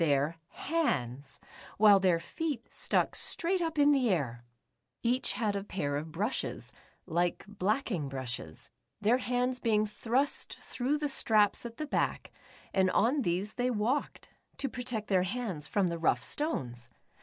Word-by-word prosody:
their 145 +1 +2
hands, 140 - -2 0.4
while 205 -1 +7
their 180 -3 +3
feet 285 - -4
stuck - - +1
straight 360 +2 +1
up 325 -2 -2
in 290 0 +6
the 265 -4 +3
air! 130 - -1 0.6
Each 245 +2 +1
had 210 -3 0
a 200 - -2
pair 145 -8 -2
of 155 +2 -4
brushes, 205 +10 -2 0.3
like 175 +1 0
blacking 205 - -1
brushes, 125 -12 -5 0.3
their 225 +5 +3
hands 250 0 0
being 215 -3 +2
thrust 240 +6 0
through 265 +4 -1
the 295 0 -1
straps 220 -4 +3
at 230 - -12
the 310 - -3
back, 295 - -1 0.4
and 190 -1 +3
on 255 +9 +3
these 190 0 -1
they 250 0 0
walked, 245 +5 -1 0.3
to 275 - -1
protect 245 -4 -4
their 190 -2 +3
hands 185 -6 -3
from 200 -5 +1
the 170 0 -3
rough 165 - +2
stones. 120 - -2
210 Hz, 150 wpm, -31 LUFS, 170-255 Hz, 0.6 s, while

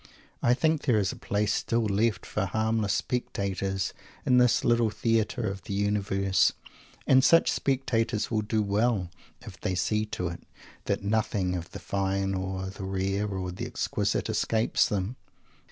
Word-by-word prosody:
I 120 +1 +4
think 160 +2 +1
there 125 -6 +3
is 100 -2 +1
a - - -8
place 105 +1 0
still 115 0 0
left 105 -1 +1
for 105 - -1
harmless 110 +1 0
spectators 95 -5 -2 0.3
in 125 -1 +5
this 125 -1 +3
Little 120 -1 +3
Theatre 115 +2 0
of 100 0 -4
the 100 - -3
Universe, 100 -2 +2 0.5
And 130 -1 +5
such 165 +3 +5
spectators 125 -6 0
will 110 -2 +1
do 105 0 0
well 100 -3 +1 0.3
if - - -11
they 95 - -1
see 105 +4 0
to 90 -4 -3
it 85 - -8 0.4
that - - -1
nothing 100 -3 0
of 85 -1 -5
the - - -8
fine 95 0 -1
or 95 0 -3
the 100 - -8
rare 95 +2 -1
or 95 -2 -3
the 90 - -5
exquisite - - -1
escapes 110 0 +1
them. 105 +4 -2
105 Hz, 160 wpm, -28 LUFS, 95-115 Hz, 0.5 s, in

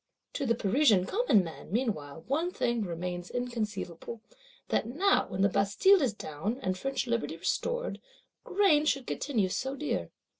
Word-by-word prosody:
To 280 - -2
the 230 - +3
Parisian 215 -3 +3
common 395 - +3
man, 165 +1 -9
meanwhile, 165 - -2
one 315 +6 0
thing 240 -9 0
remains 175 -1 -4
inconceivable: 230 -4 -4 0.5
that - - +1
now 365 +12 +2
when 185 0 -3
the - - +6
Bastille 210 - +4
is 260 -5 +2
down, 200 - -4
and 185 0 0
French 270 +9 -2
Liberty 230 -9 -1
restored, - - -2 0.4
grain 370 -7 +3
should 275 -4 +1
continue 220 -10 0
so 265 +8 -2
dear. 300 +1 -2
230 Hz, 150 wpm, -30 LUFS, 185-280 Hz, 0.5 s, the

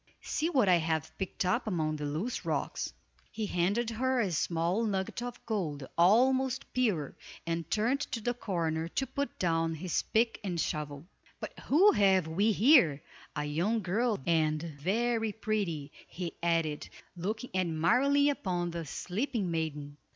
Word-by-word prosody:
See 320 +2 -1
what 260 - +3
I 180 -2 +6
have 160 -1 -2
picked 190 -1 -2
up 220 +7 +1
among 155 -6 -1
the 150 -1 -3
loose 165 +12 -3
rocks!" - - -2 0.4
He 220 -1 -3
handed 205 +6 0
her 260 +3 0
a 200 -6 +1
small 170 +6 0
nugget 195 0 -2
of 245 0 -7
gold, 155 - -3
almost 260 +8 +3
pure, 205 - 0 0.3
and 165 -1 -3
turned 235 +6 +1
to 235 - -2
the 240 +2 -1
corner 165 -8 -2
to 270 +10 -2
put 280 +2 -4
down 165 -2 +1
his 175 +2 -1
pick 230 +1 +1
and 180 -4 -2
shovel. 150 -1 -3 0.3
"But - - -7
who 370 +9 +5
have 190 - +3
we 200 +7 +2
here? 215 - +5 0.3
A 150 0 -2
young 185 +10 0
girl, 215 +5 +1
and 155 -2 +2 0.2
very 225 +5 0
pretty," 195 -10 -2 0.2
he 175 -2 -5
added, 165 -3 0 0.3
looking 215 +7 -4
admiringly 235 - +3
upon 175 -9 -2
the 165 -1 -4
sleeping 200 - -2
maiden. 150 -3 -3
185 Hz, 150 wpm, -31 LUFS, 165-230 Hz, 0.4 s, I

